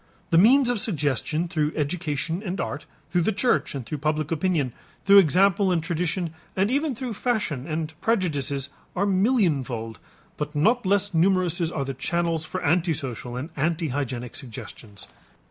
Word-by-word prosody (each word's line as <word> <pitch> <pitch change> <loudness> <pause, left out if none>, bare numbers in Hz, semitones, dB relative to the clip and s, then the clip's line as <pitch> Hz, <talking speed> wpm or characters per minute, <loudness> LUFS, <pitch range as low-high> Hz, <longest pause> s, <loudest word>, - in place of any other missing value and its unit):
The 165 - +5
means 255 +7 +6
of 240 - -1
suggestion 155 - 0
through 155 -2 -1
education 160 +2 -2
and 190 -1 -4
art, 140 - -4 0.2
through 175 0 +2
the 195 - +2
church 215 - +1
and 130 -4 -5
through 150 - -5
public 155 +1 -1
opinion, 160 -6 0 0.3
through 200 +1 +9
example 190 +2 +4
and 170 -3 +1
tradition, 170 0 -2 0.2
and 195 +4 +1
even 285 0 0
through 245 0 -4
fashion 200 - -1
and 160 0 -3
prejudices, 145 - 0 0.3
are 195 - +1
millionfold, 160 - +1 0.4
but 150 +1 -4
not 220 +8 +2
less 200 0 +2
numerous 180 0 +2
are 140 -5 -3
the 135 - -3
channels 165 +3 -1
for - - -5
antisocial 145 -7 0
and 130 +7 -6
antihygienic 140 -6 -2
suggestions. 110 -4 -9
165 Hz, 150 wpm, -25 LUFS, 145-190 Hz, 0.4 s, through